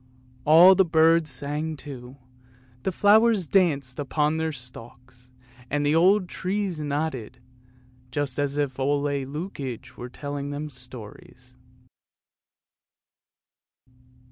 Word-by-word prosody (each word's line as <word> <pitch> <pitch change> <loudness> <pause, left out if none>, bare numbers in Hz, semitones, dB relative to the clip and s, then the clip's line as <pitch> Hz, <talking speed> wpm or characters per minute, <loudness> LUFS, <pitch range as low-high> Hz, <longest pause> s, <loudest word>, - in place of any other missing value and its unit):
" 125 0 -29
All 175 +4 +9
the 190 +1 +4
birds 165 -1 +3
sang 150 +4 -4
too, 130 -2 -10 0.6
the 190 - -1
flowers 210 +1 +4
danced 145 -8 +1
upon 150 +2 0
their 160 0 -1
stalks, 125 -1 -12 0.4
and 145 +1 0
the 145 - +2
old 185 +4 +4
trees 185 -3 -3
nodded, 145 -5 -3 0.7
just 140 0 -2
as 145 0 -1
if 140 -3 -2
Ole 140 +2 +1
Lukoie 140 - -5
were 125 - -7
telling 145 +1 -6
them 145 +1 -5
stories. 125 0 -11
145 Hz, 110 wpm, -25 LUFS, 130-160 Hz, 0.7 s, All